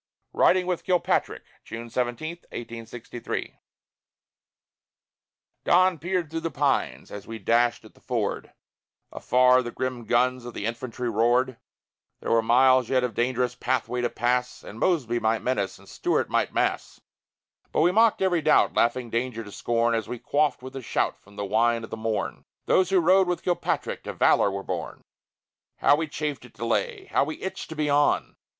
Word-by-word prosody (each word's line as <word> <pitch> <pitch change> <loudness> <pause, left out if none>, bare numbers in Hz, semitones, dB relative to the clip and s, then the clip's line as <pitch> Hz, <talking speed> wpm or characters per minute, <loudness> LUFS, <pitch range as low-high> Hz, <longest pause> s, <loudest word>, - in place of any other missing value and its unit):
RIDING 185 0 +4
WITH 180 -2 -2
KILPATRICK 180 -2 0 0.2
[June 115 +1 -7
17, 125 +8 -2
1863] 115 0 -7 2.0
Dawn 185 -1 +4
peered 175 -1 -2
through 165 - -2
the 165 0 -3
pines 145 -2 -1
as 100 - -8
we 115 - -6
dashed 120 +3 +1
at - - -15
the - - -23
ford; - - -3 0.6
Afar 125 +1 +4
the 120 - -5
grim 130 -1 -4
guns 125 +1 +1
of 120 0 -9
the 105 - -4
infantry 120 +2 -4
roared; 120 +3 +2 0.6
There - - -4
were 115 0 +4
miles 130 +2 +4
yet 130 -1 +2
of 125 -2 -2
dangerous 125 +2 0
pathway 125 0 -1
to 120 - 0
pass, 125 +2 -1
And 110 - -10
Mosby 125 -10 +1
might 110 0 0
menace, 105 -6 -1
and - - -19
Stuart - - -1
might - - +1
mass; - - -1 0.7
But - - +1
we 175 - +4
mocked 220 0 +3
every 175 -3 +2
doubt, 155 0 +4
laughing 120 0 +1
danger 115 -1 -2
to 105 - -11
scorn, 115 +2 0
As 115 -3 -2
we 125 - -4
quaffed 145 +2 0
with 130 +1 -9
a 135 - -5
shout 115 - -1
from 100 +1 -20
the 100 0 -3
wine 115 +3 +2
of 110 - -9
the - - -3
morn. 110 -1 -3 0.2
Those 185 -2 +3
who 195 -1 +4
rode 185 +2 +4
with 180 -1 -2
Kilpatrick 175 -1 -1
to - - -4
valor - - +4
were 100 0 -4
born! - - -5 0.7
How - - +5
we 160 +2 -2
chafed 150 -3 -4
at 125 - -16
delay! 115 +1 -2
How - - +3
we 155 +2 -5
itched 190 - -6
to 160 - -7
be 150 -1 -1
on! 145 0 +2
125 Hz, 175 wpm, -25 LUFS, 115-150 Hz, 2.0 s, How